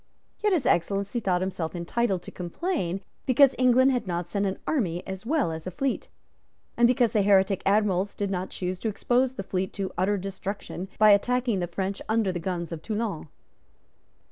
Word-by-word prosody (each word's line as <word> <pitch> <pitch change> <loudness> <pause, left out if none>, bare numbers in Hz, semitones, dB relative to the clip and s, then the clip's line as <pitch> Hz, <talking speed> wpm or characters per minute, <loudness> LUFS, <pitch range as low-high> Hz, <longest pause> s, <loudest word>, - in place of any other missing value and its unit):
Yet 420 - +1
His 330 -9 +1
Excellency 195 +6 +1
thought 185 -5 0
himself 180 -3 -3
entitled 190 +2 -1
to - - -9
complain 190 - -3 0.3
because 270 +1 +6
England 255 +1 +5
had 245 -5 -1
not 175 -1 -2
sent 200 0 0
an 190 - -2
army 180 - -1
as 190 +3 -7
well 285 - +1
as 160 +2 -6
a - - -1
fleet, 270 +8 -2 0.7
and 235 0 +5
because 245 -2 +3
the 210 - +2
heretic 195 -1 +3
Admiral 200 -1 +2
did 200 -1 -1
not 185 0 -2
choose 180 0 -4
to - - -3
expose 245 +4 +1
the 195 - -4
fleet 185 0 -2
to 195 -2 -4
utter 200 +3 +2
destruction 195 -1 -5
by 215 -1 +7
attacking 240 +1 +2
the 175 - -1
French 190 +3 -3
under 220 -3 +2
the 175 - -3
guns 170 -1 -3
of 165 -2 -5
Toulon. 210 -5 -3
195 Hz, 185 wpm, -26 LUFS, 185-235 Hz, 0.7 s, by